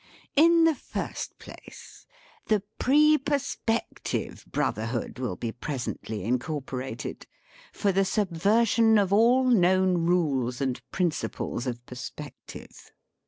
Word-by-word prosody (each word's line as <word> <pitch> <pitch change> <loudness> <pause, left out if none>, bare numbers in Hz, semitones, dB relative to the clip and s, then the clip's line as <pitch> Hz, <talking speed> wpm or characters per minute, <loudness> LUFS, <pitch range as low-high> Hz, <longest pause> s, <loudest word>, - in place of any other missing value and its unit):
In 335 +3 +6
the 325 -1 +5
first 265 - -6
place, - - -13 0.4
the 210 -3 +2 0.2
Pre 300 +3 +5
Perspective 265 -5 -2
Bro - - +1
therhood 115 +3 -4
will 125 -8 -2
be 115 +4 -4
presently 120 -5 -5
incorporated, 125 +1 -4 0.4
for 200 - 0
the 195 +1 +2
subversion 210 +4 +3
of 200 -2 +2
all 240 +5 +5
known 185 -5 +3
rules 135 -9 +1
and 130 -3 -2
prin 180 +2 +1
ciples 130 -4 -4
of 120 -1 -5
perspective. 125 -1 -10
180 Hz, 115 wpm, -27 LUFS, -, 0.4 s, In